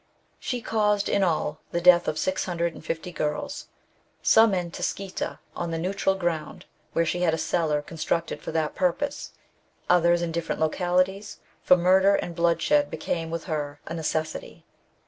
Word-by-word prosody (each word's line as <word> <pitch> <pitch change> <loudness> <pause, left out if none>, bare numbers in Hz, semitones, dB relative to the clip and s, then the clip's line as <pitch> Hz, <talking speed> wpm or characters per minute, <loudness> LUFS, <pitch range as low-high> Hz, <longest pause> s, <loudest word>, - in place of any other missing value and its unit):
'•' - - -40 0.4
She 245 -2 -3
causedj 210 -2 +1
in - - +2
all, 155 -3 0
the 170 - -1
death 175 0 +6
of 155 - -1
650 170 -1 -2
girls, 170 - -3 0.6
some 220 -3 +5
in 175 -2 -2
Tscheita, 195 +2 -4 0.2
on 170 - -3
the 165 - -2
neutral 195 +3 0
ground, 170 -5 -3 0.3
where 165 - +2
she 175 +2 -1
had 165 -3 +3
a - - -5
cellar 155 -4 0
constructed 165 +2 -3
for - - -5
the 155 -2 0
purpose; 190 +11 -1 0.6
others 175 -1 +4
in 170 - -2
different 165 0 -3
localities; 185 +5 0 0.2
for 180 - +5
murder 190 +3 +4
and 170 - -3
Woodshed 170 - +2
hecame 165 -1 -3
with 165 0 -4
her 145 -3 -4
a 165 - -6
necessity. 160 -1 -3
175 Hz, 155 wpm, -26 LUFS, 165-190 Hz, 0.6 s, death